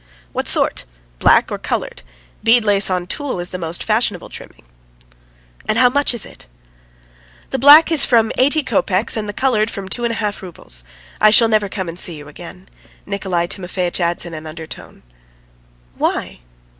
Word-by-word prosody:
"What - - -3
sort? - - +3 0.3
Black - - +3
or - - -4
coloured? - - -4 0.4
Bead 230 0 +3
lace 200 -1 +3
on 180 -1 -2
tulle 275 0 -4
is 175 0 -5
the 185 - -6
most 165 0 -3
fashionable 215 -4 -1
trimming." - - -12 1.0
"And 215 - 0
how 250 +1 +5
much 285 -1 +1
is 230 - -1
it?" - - -15 1.0
"The 265 - -2
black's 300 +3 +7
from 225 -3 +2
eighty 285 +4 +2
kopecks 225 -7 0
and 210 -2 -4
the - - -2
coloured 220 -2 0
from 195 -4 -7
two 240 +5 -3
and 235 - 0
a - - -5
half 210 -2 -4
roubles. 160 - -5 0.4
I 215 - +6
shall 225 +2 +5
never 215 -2 +1
come 190 -2 -5
and 165 +1 -3
see 175 - +4
you 145 -1 -11
again," 180 +5 -12 0.4
Nikolay 190 -4 -2
Timofeitch 180 0 -3
adds 170 0 0
in 170 - -9
an 155 0 -8
undertone. 160 0 -10 0.9
"Why?" - - -3
200 Hz, 170 wpm, -17 LUFS, 175-235 Hz, 1.0 s, black's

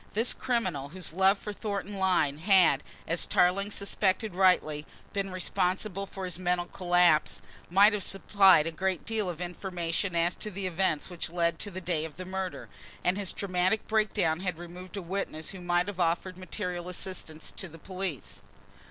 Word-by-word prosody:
This 225 +4 +2
criminal, 185 - -1
whose 175 -1 -4
love 190 +2 +4
for 210 +1 -6
Thornton 205 -1 -4
Lyne 175 -7 +2
had, 180 -6 +5 0.3
as 165 +1 0
Tarling 190 +3 +3
suspected 200 0 0
rightly, 175 -5 +3 0.3
been 195 -1 -1
responsible 185 +2 -1
for 190 -1 -6
his 180 -1 -3
mental 180 -1 0
collapse, 175 -3 +3 0.3
might 200 +4 +6
have 210 - -1
supplied 195 -4 +5
a 165 - -2
great 185 +2 -2
deal 220 -4 -1
of 170 -2 -5
information 180 0 -2
as 170 +1 +2
to 215 - -4
the 195 -1 -5
events 185 -2 0
which 175 -2 -3
led 170 0 +1
up - - -23
to 205 - -2
the 185 -1 -6
day 170 -3 0
of 160 -1 -7
the 185 - -6
murder, 190 0 -4 0.4
and 180 - +2
his 200 -2 -1
dramatic 185 +2 0
breakdown 210 -7 +1
had 180 -3 -2
removed 180 +3 -9
a 195 - -4
witness 170 -3 -3
who 190 - -9
might 175 0 +2
have 200 -2 -6
offered 175 +2 0
material 180 -1 -4
assistance 175 -4 -4
to 190 - -5
the 165 0 -12
police. 185 -4 -5
185 Hz, 180 wpm, -29 LUFS, 175-195 Hz, 0.4 s, might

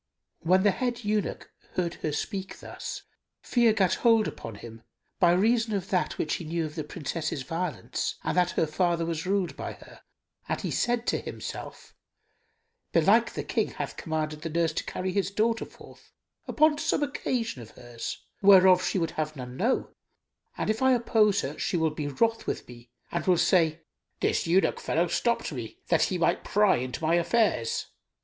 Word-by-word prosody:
When 185 +3 +3
the 205 - +5
head 240 +3 -2
eunuch 210 -1 -2 0.2
heard 175 -2 -1
her 155 - -1
speak 190 +5 -4
thus, - - -7 0.4
fear 235 -2 +3
gat 195 -4 +2
hold 225 -2 +4
upon 115 -2 -7
him, 115 +2 -11 0.4
by 175 -2 +5
reason 220 +4 +2
of 195 -2 -3
that 180 -2 0
which 155 - -1
he - - -7
knew 165 +1 -2
of 150 - -7
the 155 -1 -4
Princess's 155 -2 -4
violence 165 +1 -3
and - - -1
that 180 -1 +3
her - - +4
father 170 +1 0
was 165 +1 -3
ruled 195 -2 0
by - - -5
her, - - -15 0.5
and - - -1
he - - -3
said 240 -1 0
to - - +1
himself, - - -8 1.0
"Belike - - +4
the - - -4
King - - 0
hath - - -5
commanded 155 -2 -3
the 165 - -4
nurse 165 0 +1
to - - -2
carry 185 0 -3
his 195 0 0
daughter 225 +3 0
forth - - -16 0.4
upon 305 -1 +3
some 290 - +1
occasion 240 - -2
of 115 - -11
hers, 120 -1 -7 0.2
whereof 190 -2 +7
she - - 0
would 165 -3 0
have 155 0 -3
none 125 -2 -7
know; 235 - 0 0.7
and - - 0
if 220 - -4
I 260 0 +5
oppose 220 -4 +3
her, 140 +3 -5
she 180 - 0
will 160 -1 +1
be 150 -1 -4
wroth 225 - 0
with - - -3
me 120 -1 -13 0.2
and 170 0 -3
will 180 -2 +5
say, 165 -2 +3 0.4
'This - - 0
eunuch 185 +3 +3
fellow 170 +3 +1
stopped 235 +6 0
me, 120 -6 -6
that 165 - +4
he 185 - -2
might 170 - +1
pry 210 -2 +3
into 125 +3 -4
my 160 - +2
affairs. 175 - +1
175 Hz, 185 wpm, -27 LUFS, 155-210 Hz, 1.0 s, whereof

